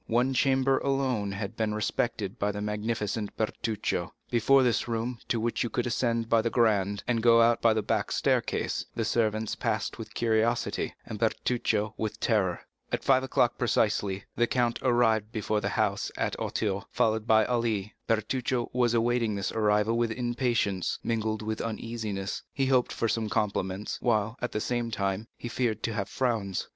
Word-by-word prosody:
One 125 +3 +2
chamber 135 +1 +3
alone 130 -7 0
had 100 +2 -5
been 110 -2 -1
respected 105 -1 -2
by 105 +1 +1
the 105 - -4
magnificent 105 0 -2
Bertuccio. 110 0 -2 0.2
Before 130 +3 +5
this 120 -1 +1
room, 115 +1 -2
to 115 - 0
which 115 +1 -1
you 120 - 0
could 125 - -1
ascend 115 -1 0
by 115 0 +4
the 115 - 0
grand, 105 -4 +2
and 115 -2 +1
go 115 0 +6
out 115 0 +4
by 115 -1 +4
the 110 - 0
back - - -1
staircase, - - 0
the 115 - -1
servants 110 -1 0
passed - - -2
with - - -8
curiosity, 115 +1 0
and 105 - -6
Bertuccio 110 -2 0
with 110 0 -3
terror. 95 -6 +1 0.3
At - - -1
five 130 -1 +4
o'clock 125 -2 +1
precisely, 105 -5 +1
the 120 - +2
count 120 -2 +1
arrived 115 -4 +2
before 110 -1 -1
the 100 - -1
house 100 -1 0
at - - -1
Auteuil, 100 -1 -2
followed 110 0 +1
by 110 -1 +5
Ali. 115 -4 -1
Bertuccio 120 +2 0
was 120 -1 +2
awaiting 115 -2 +1
this 100 -1 -2
arrival 105 0 +2
with 120 -1 +2
impatience, 120 -5 0
mingled 110 -1 -1
with 110 0 -3
uneasiness; 110 -3 -4
he 135 - 0
hoped 130 -2 +2
for 115 - -1
some 110 -1 -1
compliments, 100 0 -1
while, 110 -1 +1
at 125 - -2
the 105 - -1
same 120 0 -1
time, 100 0 -2
he - - -6
feared 115 -3 -1
to 115 - -1
have 100 -1 -3
frowns. 110 -7 -1
115 Hz, 175 wpm, -28 LUFS, 105-120 Hz, 0.3 s, go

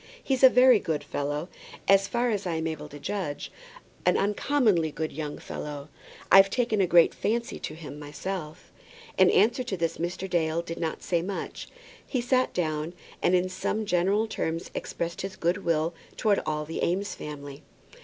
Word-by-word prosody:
He's 265 -2 0
a 260 - +11
very 250 -3 +6
good 155 -5 -2
fellow, 145 +3 -3 0.4
as 195 0 +5
far 240 0 0
as 200 -3 -2
I 170 - -1
am 160 0 -2
able 155 -2 -4
to 145 - -9
judge, 150 -1 -4 0.5
an 180 - +3
uncommonly 210 - +2
good 155 +1 -4
young 150 0 -5
man. 145 0 -6 0.4
I've 195 0 +8
taken 225 -2 +1
a 185 - +3
great 170 -1 +6
fancy 235 +2 -2
to 155 - -6
him 150 -2 -9
myself." 155 +3 -6 0.5
In - - +7
answer 230 +6 +3
to 210 -6 -3
this 165 -1 -1
Mr. 180 +3 -3
Dale 170 -2 0
did 165 0 -6
not 160 -2 -3
say 170 -2 +1
much. 190 +3 -5 0.4
He 255 - -2
sat 255 +1 +2
down, 155 -1 -2 0.3
and 185 - +3
in 180 0 +2
some 205 +4 -2
general 195 +3 +2
terms 165 -6 -3
expressed 170 0 -4
his 195 0 -5
good 175 +4 0
will 165 0 +1 0.2
towards 210 -3 +2
all 150 -1 -1
the 160 - -4
Eames 195 +4 0
family. 145 -2 -8
175 Hz, 175 wpm, -27 LUFS, 155-205 Hz, 0.5 s, a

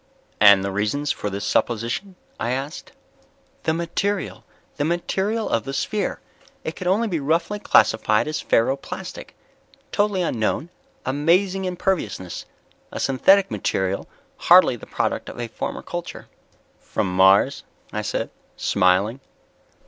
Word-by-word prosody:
"And 100 -2 +7
the 100 - -2
reasons 105 +9 -1
for 105 - -3
this 100 0 -4
supposition?" 120 - -1 0.2
I 120 0 -1
asked. 135 +4 -5 0.7
"The 160 - +2
material... 190 +4 -2 0.3
the 145 - 0
material 190 +7 -1
of 115 - 0
the 135 +3 -5
sphere. 210 +8 -1 0.4
It - - -4
could 185 - -5
only 210 +5 +2
be 175 -6 -1
roughly 165 +8 0
classified 110 - +3
as 155 - -2
ferro 120 +4 +2
plastic. - - -8 0.6
Totally 205 -3 +1
unknown, 150 +4 -1 0.3
amazing 180 +8 +2
imperviousness. 175 - -2 0.4
A - - -5
synthetic 190 +9 +4
material, 95 -2 -1 0.3
hardly 175 -7 +6
the 120 - -12
product - - -2
of - - -9
a 120 - -3
former 115 - -5
culture." 175 0 -6 0.5
"From 90 -1 -2
Mars?" 95 +1 +5 0.3
I - - -1
said, - - -3 0.3
smiling. 100 +7 +2
145 Hz, 130 wpm, -23 LUFS, -, 0.7 s, And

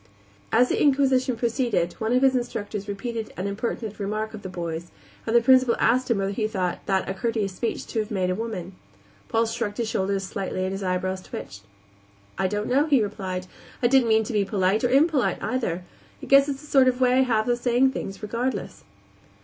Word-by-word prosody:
As 245 +3 +4
the - - 0
inquisition 265 -3 +3
proceeded 230 -7 0
one 220 +1 -1
of 250 +2 +3
his 265 -1 +4
instructors 210 -4 -3
repeated 220 +2 -4
an 185 - -3
impertinent 215 +1 -4
remark 215 +2 -3
of 215 - -8
the 190 - -7
boy's, 170 -1 -5 0.4
and 225 - 0
the 235 - +7
Principal 255 -1 +5
asked 255 +3 +2
him 230 - +2
whether 195 0 -1
he 215 +1 -1
thought 185 -5 -2
that 190 -1 +1
a 190 - -2
courteous 215 -2 -2
speech 230 +5 -3
to 225 - -3
have 215 -1 -2
made 185 -3 0
a - - +1
woman. 195 -3 -5 0.6
Paul 225 +1 +2
shrugged 220 -2 -3
his 235 - -1
shoulders 195 -2 -1
slightly 190 -1 -3
and 185 - -1
his 195 +1 -4
eyebrows 185 0 -1
twitched. 100 - -8 0.7
"I 190 - 0
don't 210 +2 -2
know," 280 +5 +2
he 275 -7 +4
replied. 185 -3 -4 0.4
"I - - +4
didn't 255 -2 +4
mean 220 0 +4
to 220 - -5
be 205 -2 +2
polite 195 +2 +1
or 245 - +3
impolite, 280 +1 +3
either. 185 -9 -2 0.4
I - - -9
guess 275 +1 +5
it's 275 +1 -4
a - - -12
sort 270 -3 +4
of 250 0 +2
way 255 0 +4
I - - +6
have 225 -4 +1
of 240 0 +1
saying 250 +2 +3
things 195 -5 -6
regardless." 235 +5 -3
220 Hz, 210 wpm, -25 LUFS, 195-250 Hz, 0.7 s, the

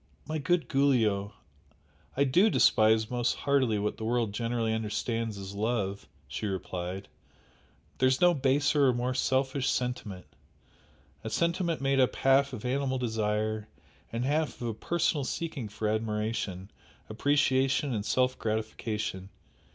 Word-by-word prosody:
"My 155 0 -3
good 175 +3 +1
Giulio, 110 -8 +2 0.8
I 140 - +4
DO 175 +11 +4
despise 110 - +4
most 120 -1 0
heartily 135 -6 +1
what 105 +1 -2
the 110 - -6
world 115 -2 0
generally 115 0 -1
understands 110 0 -2
as 95 0 -7
love" 100 -2 -2 0.2
she 105 - -4
replied; 95 0 -4 0.9
"There 130 - +4
is 130 - +1
no 175 0 +5
baser 140 0 +2
or 130 - +4
more 125 +1 -1
selfish 130 +1 0
sentiment! 125 -7 -3 1.0
a - - -4
sentiment 170 -1 0
made 135 0 +2
up 130 - +3
half 135 +1 +3
of 125 -2 -7
animal 130 +1 0
desire 110 -2 -1 0.4
and 115 +2 -2
half 150 +2 0
of 120 - -3
a - - -2
personal 160 +3 0
seeking 135 -5 -4
for 105 +1 -3
admiration, 105 -3 -2 0.4
appreciation 135 +2 +1
and 105 -3 -2
self 130 +3 +1
gratification! 110 -3 -3
120 Hz, 135 wpm, -29 LUFS, 110-135 Hz, 1.0 s, no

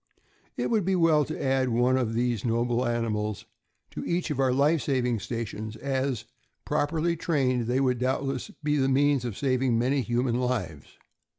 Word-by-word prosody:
It - - -1
would 220 -3 +2
be 190 +2 +1
well 160 -4 +4
to - - -5
add 130 -1 +1
one 125 +2 +2
of 120 -4 0
these 120 -2 0
noble 120 +1 0
animals 105 -3 -2 0.5
to - - -6
each 170 -1 -1
of 140 - -3
our 130 -1 +3
life 145 +4 +3
saving 125 -4 0
stations, 110 -1 -5
as, 130 -3 -2 0.4
properly 160 +3 0
trained, 130 -8 0
they 125 +2 +1
would 125 -3 +1
doubtless 130 +1 -1
be 150 0 +1
the 135 -1 +2
means 140 -1 +2
of 115 -5 -4
saving 130 -3 +1
many 130 +4 +1
human 120 0 0
lives. 105 - -3
130 Hz, 170 wpm, -27 LUFS, 120-140 Hz, 0.5 s, well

